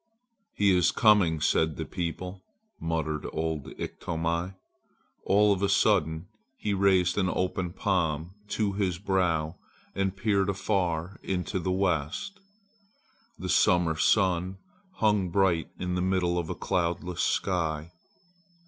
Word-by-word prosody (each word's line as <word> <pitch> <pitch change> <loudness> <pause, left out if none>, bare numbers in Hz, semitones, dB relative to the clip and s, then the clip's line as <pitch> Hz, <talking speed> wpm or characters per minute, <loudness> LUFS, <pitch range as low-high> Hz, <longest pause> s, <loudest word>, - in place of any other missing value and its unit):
"'He 100 -2 +4
is 90 -1 +4
coming!' 100 -8 +4
said 80 0 +2
the - - -4
people," 90 +1 -5 0.4
muttered 80 -2 -2
old 80 -3 -3
Iktomi. 85 +2 -3 0.7
All 105 +1 +4
of 95 - -4
a 100 - +2
sudden 90 -5 +2 0.3
he 105 - -2
raised 95 -1 +3
an 95 -2 +1
open 90 -1 -1
palm 85 -4 -1 0.2
to 105 -1 -1
his 95 -3 -1
brow 90 -4 0 0.4
and 95 0 -1
peered 100 -2 +1
afar 95 -3 -1
into 95 +1 -2
the 90 +1 -1
west. 90 - -1 1.0
The - - -5
summer 85 -2 +3
sun 95 +1 +2 0.4
hung 105 -4 +2
bright 90 -3 +2
in 90 0 -3
the 90 - 0
middle 90 -1 +1
of 85 - -4
a - - -3
cloudless 85 0 -1
sky. 85 -3 -1
90 Hz, 125 wpm, -28 LUFS, 85-95 Hz, 1.0 s, He